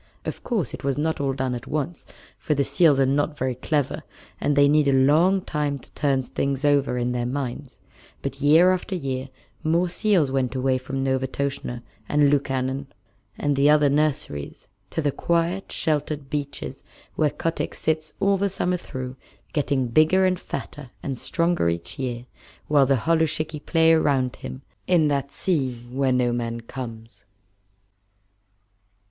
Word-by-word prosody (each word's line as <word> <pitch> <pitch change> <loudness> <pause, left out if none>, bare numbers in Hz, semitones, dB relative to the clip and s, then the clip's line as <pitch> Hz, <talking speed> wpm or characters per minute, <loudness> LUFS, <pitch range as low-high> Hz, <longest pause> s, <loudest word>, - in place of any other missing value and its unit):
Of - - -5
course 195 - -1
it - - -7
was 140 0 0
not 160 +1 0
all 140 -1 +1
done 130 -1 -2
at 120 - -6
once, 155 +3 -3 0.3
for 150 - 0
the 140 - +2
seals 150 -1 +4
are 135 - +5
not 145 +3 0
very 130 -1 -1
clever, 145 +3 -1 0.4
and 145 - +1
they 145 0 +6
need 150 0 +4
a - - +4
long 155 +8 +4
time 150 -2 -1
to 130 - -15
turn 135 -2 +1
things 135 +2 -2
over 140 -3 +2
in 120 0 0
their 120 -1 -1
minds, 130 0 -4 0.5
but - - -4
year 160 +6 +6
after 185 +1 -2
year 135 -5 -3 0.3
more 170 +3 +2
seals 180 -7 +2
went 130 -1 0
away 130 0 +1
from 135 +1 -3
Novastoshnah, 130 -2 -2 0.3
and 145 -1 +4
Lukannon, 135 -1 -1 0.5
and 145 -1 0
the 140 +2 +4
other 150 -2 +5
nurseries, 145 - -1 0.2
to 160 - -2
the 145 - +2
quiet, 170 +5 -1
sheltered 150 -2 -1
beaches 145 -1 -4 0.3
where 155 - +2
Kotick 165 +3 -3
sits 155 -1 -1
all 200 0 +3
the 200 +1 +1
summer 180 -1 -1
through, 130 -5 -7 0.4
getting 140 -3 +1
bigger 155 +9 +4
and 185 -1 +1
fatter 145 -4 -7
and 135 - -2
stronger 170 - +1
each 85 +3 -5
year, 120 -2 -3 0.4
while 145 -3 +4
the 135 0 +3
holluschickie 160 -2 0
play 165 -1 +5
around 135 -5 +2
him, 130 - -8 0.2
in 165 -4 +4
that 140 -1 -1
sea 140 -6 0 0.2
where 135 0 +1
no 125 -1 +2
man 115 -1 -2
comes. 115 -4 -8
140 Hz, 160 wpm, -24 LUFS, 130-155 Hz, 0.5 s, they